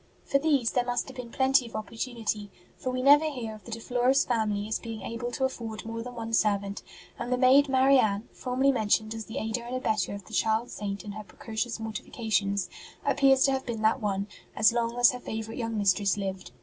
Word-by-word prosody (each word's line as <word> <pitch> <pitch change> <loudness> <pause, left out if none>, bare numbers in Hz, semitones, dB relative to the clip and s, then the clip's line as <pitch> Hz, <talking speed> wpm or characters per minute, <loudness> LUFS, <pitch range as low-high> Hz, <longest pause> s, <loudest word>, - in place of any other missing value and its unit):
For 275 - +2
these 280 -6 +2
there 250 - +2
must 245 0 -1
have 260 - -11
been 250 -2 -6
plenty 265 0 +3
of - - -11
opportunity, 225 -2 -3 0.3
for 255 - -4
we 255 0 -2
never 290 +3 +7
hear 240 -6 -5
of 215 - -13
the 235 - -9
De 230 - -4
Flores 245 +3 +2
family 215 -4 0
as 220 - -1
being 225 -2 -7
able 230 +1 -4
to 265 - -2
afford 225 -5 -5
more 230 0 -4
than 245 +1 -8
one 225 -1 -5
servant; 200 -2 +1 0.4
and 245 - -4
the 250 - +2
maid 270 +3 +5
Marianne, 260 -6 +3
formerly 260 +2 +1
mentioned 220 -2 +1
as 225 -1 -6
the 225 - -7
aider 225 -1 -2
and 240 +2 -5
abettor 215 -6 0
of 200 -2 -9
the - - -14
child 220 +2 +1
Saint 200 -1 -4
in 205 - -5
her 215 +1 -7
precocious 225 +3 -4
mortifications, 215 -2 -1 0.4
appears 270 -1 +4
to 275 - +4
have 265 -1 -2
been 225 -2 -3
that 220 +4 +3
one, 200 -1 -1 0.3
as 220 - +5
long 235 0 -1
as 245 0 +6
her 250 - -6
favourite 220 0 -5
young 230 -2 -2
mistress 200 -1 +2
lived. 190 -1 -4
230 Hz, 215 wpm, -28 LUFS, 215-255 Hz, 0.4 s, never